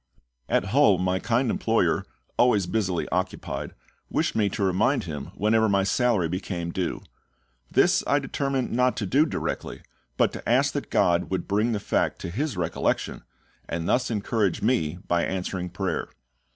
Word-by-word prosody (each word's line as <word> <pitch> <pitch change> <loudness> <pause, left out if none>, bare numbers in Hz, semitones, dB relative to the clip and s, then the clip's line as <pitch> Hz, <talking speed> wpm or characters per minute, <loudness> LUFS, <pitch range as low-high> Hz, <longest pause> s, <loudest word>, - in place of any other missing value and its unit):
At - - +2
Hull 100 - +5
my 90 +1 0
kind 120 +2 +1
employer, - - +1 0.3
always 110 -6 +3
busily 95 -3 -1
occupied, 90 +1 -3 0.3
wished - - 0
me 105 -2 +2
to 100 - -3
remind 100 +9 +2
him 75 -5 -5
whenever 110 +1 +3
my 100 -1 +3
salary 110 -3 +2
became 90 -1 -4
due. 90 0 -3 0.7
This - - +3
I - - +3
determined 135 -2 -1
not 125 +1 +2
to 105 - -1
do 140 - +3
directly, - - -4 0.3
but - - +3
to - - -6
ask - - +3
that - - -4
GOD 85 0 +2
would 95 -2 -2
bring 105 +4 +1
the 105 - -1
fact - - 0
to 85 - -5
his 140 - -2
recollection, 85 -1 -1 0.5
and 85 0 -3
thus 125 - +2
encourage 105 -3 0
me 105 -9 +1
by 85 -1 +2
answering 90 -1 -3
prayer. 90 -1 -3
100 Hz, 160 wpm, -25 LUFS, 90-115 Hz, 0.7 s, Hull